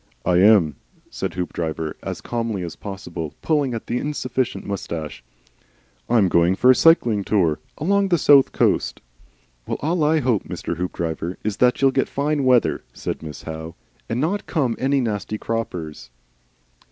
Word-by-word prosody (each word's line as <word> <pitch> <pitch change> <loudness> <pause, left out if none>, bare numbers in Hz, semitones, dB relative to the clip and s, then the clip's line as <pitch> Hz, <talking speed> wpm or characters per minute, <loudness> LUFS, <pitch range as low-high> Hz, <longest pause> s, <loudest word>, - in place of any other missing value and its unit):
"I 90 -1 +3
am," 90 -7 +5 0.3
said 95 -2 -4
Hoopdriver 80 -3 -3
as - - -5
calmly 115 -5 -3
as 85 - -6
possible, 85 -6 -7
pulling 145 -6 +1
at 115 - -6
the 120 - -1
insufficient 130 -4 -2
moustache. 80 -9 -5 0.9
"I'm 110 -5 +4
going 85 +1 +3
for 125 +6 +6
a - - +5
Cycling 120 - +4
Tour. 90 -7 +1 0.2
Along 200 +5 +2
the 175 -2 +3
South 140 -3 +5
Coast." - - +1 0.7
"Well, - - -2
all 160 +2 0
I 155 +1 +3
hope, 125 -7 0
Mr. - - -5
Hoopdriver, 85 0 -3
is 105 -2 -2
that 125 0 +3
you'll 135 - +6
get - - 0
fine 145 0 0
weather," 125 -3 +3
said - - -5
Miss 75 -3 -8
Howe. 80 +1 -7 0.3
"And 115 - -1
not 185 +8 -1
come 130 -9 0
any 135 +1 +2
nasty 105 -3 -3
croppers." 90 - -4
110 Hz, 155 wpm, -22 LUFS, 85-135 Hz, 0.9 s, for